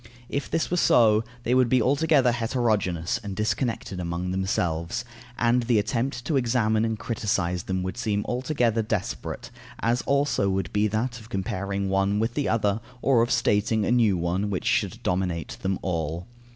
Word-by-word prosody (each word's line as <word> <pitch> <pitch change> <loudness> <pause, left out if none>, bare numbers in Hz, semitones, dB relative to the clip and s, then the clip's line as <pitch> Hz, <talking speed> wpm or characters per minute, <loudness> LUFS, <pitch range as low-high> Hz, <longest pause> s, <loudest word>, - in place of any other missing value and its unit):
If 140 - -3
this 165 +1 -1
were 180 - +1
so, 110 -8 +5 0.2
they 120 - +1
would 130 -2 +4
be 130 - +4
altogether 140 +1 +3
heterogeneous 115 -7 0
and 100 -2 -5
disconnected 110 -1 -2
among 90 +1 -3
themselves, 90 +1 -1 0.3
and 120 +1 +3
the 120 -1 +2
attempt 120 +3 -1
to 145 - +1
examine 115 -3 +2
and 110 -1 -1
criticize 95 -6 -1
them 95 -1 -2
would 95 0 -4
seem 105 -5 -1
altogether 125 -3 0
desperate, 105 -3 -4 0.3
as 120 +2 +1
also 140 -8 +2
would 95 -3 -2
be 105 +1 +3
that 115 +3 -2
of 110 0 -14
comparing 100 -1 -2
one 95 +1 +1
with 115 +2 0
the 145 +1 -1
other, 110 -1 +1 0.2
or 130 -4 +4
of 120 - +1
stating 110 -3 +2
a - - 0
new 115 -6 +3
one, 90 +4 -1
which 95 -3 -3
should - - 0
dominate 90 -2 -2
them 95 0 0
all. 85 -1 -2
110 Hz, 170 wpm, -25 LUFS, 95-120 Hz, 0.3 s, so